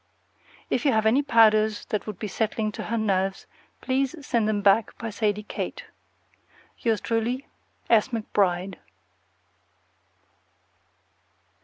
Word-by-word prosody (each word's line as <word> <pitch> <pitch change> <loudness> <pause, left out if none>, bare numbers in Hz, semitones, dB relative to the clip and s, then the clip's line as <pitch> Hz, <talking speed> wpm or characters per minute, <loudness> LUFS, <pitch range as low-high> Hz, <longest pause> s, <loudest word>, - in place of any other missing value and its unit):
If 245 - +1
you 280 - +3
have 220 0 +2
any 235 +6 +4
powders 220 -5 +4
that 210 - -2
would 210 -3 -5
be 215 - -4
settling 215 +1 -1
to - - -6
her 230 - -2
nerves, 195 -3 0 0.4
please 265 +2 0
send 230 -4 +1
them 205 -1 -1
back 205 +2 +3
by 225 -1 -5
Sadie 210 0 -1
Kate. - - -5 1.0
Yours 225 -3 0
truly, 235 +4 -1 0.4
S. 225 -3 +4
McBRIDE. 195 -6 -1
220 Hz, 120 wpm, -25 LUFS, 205-230 Hz, 1.0 s, any